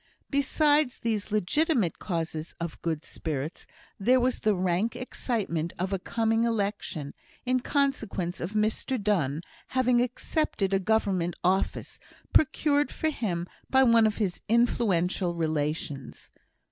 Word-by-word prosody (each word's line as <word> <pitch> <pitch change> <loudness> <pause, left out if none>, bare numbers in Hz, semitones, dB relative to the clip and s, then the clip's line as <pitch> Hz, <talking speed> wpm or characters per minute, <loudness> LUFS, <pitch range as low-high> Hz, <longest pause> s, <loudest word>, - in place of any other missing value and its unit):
Besides 290 0 +3
these 220 -2 -2
legitimate 215 - +1
causes 165 -3 -3
of 170 -1 -5
good 160 -2 -2
spirits, 155 0 -5 0.3
there 250 +6 +4
was 250 0 +1
the 215 -1 +2
rank 185 +5 0
excitement 200 -10 -2
of 185 +3 -2
a 195 - 0
coming 225 +3 +1
election, 200 -10 -2 0.3
in 255 0 +2
consequence 225 - -1
of 175 +5 -4
Mr 215 +4 0
Donne 170 -8 0 0.4
having 250 -1 +4
accepted 245 -4 -1
a 195 - +4
Government 190 -4 +1
office, 185 +2 0 0.3
procured 290 0 +3
for 315 - -1
him 175 - -2 0.2
by 265 0 +5
one 230 -3 +6
of 215 - -2
his 195 -5 -1
influential 195 -6 +2
relations. 150 -4 -3
205 Hz, 125 wpm, -28 LUFS, 170-245 Hz, 0.4 s, one